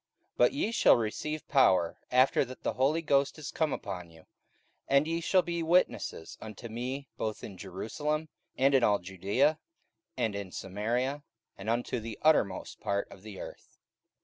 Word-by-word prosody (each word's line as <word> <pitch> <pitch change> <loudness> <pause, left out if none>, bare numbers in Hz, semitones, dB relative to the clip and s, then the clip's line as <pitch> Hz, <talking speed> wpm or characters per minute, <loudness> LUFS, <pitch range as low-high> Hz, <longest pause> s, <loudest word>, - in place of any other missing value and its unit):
44:001:008 - - -48
But - - +5
ye 280 -5 0
shall 230 - +6
receive 150 +7 -3
power, 95 - +3
after 130 +2 +4
that 130 +1 -11
the - - 0
Holy 140 +8 +1
Ghost 140 -1 +2
is 155 - -6
come 160 -2 0
upon 90 -6 -5
you: 80 -1 -18 0.6
and 140 +2 +4
ye 165 +1 -1
shall 185 +2 +3
be 170 -1 -2
witnesses 160 - 0
unto 110 +2 -8
me 130 +5 -4
both 110 -1 -3
in 100 - -7
Jerusalem, 145 - -3 0.3
and 135 +1 +4
in 130 -2 +5
all 105 -2 +4
Judaea, 100 - +1 0.6
and 115 -4 0
in 100 -2 -5
Samaria, 120 +10 -2 0.3
and 100 +3 -6
unto 120 +1 0
the 110 -1 -7
uttermost 110 -12 +2
part 100 0 -2
of - - -12
the 105 -1 -9
earth. - - -10
125 Hz, 170 wpm, -30 LUFS, 100-150 Hz, 0.6 s, shall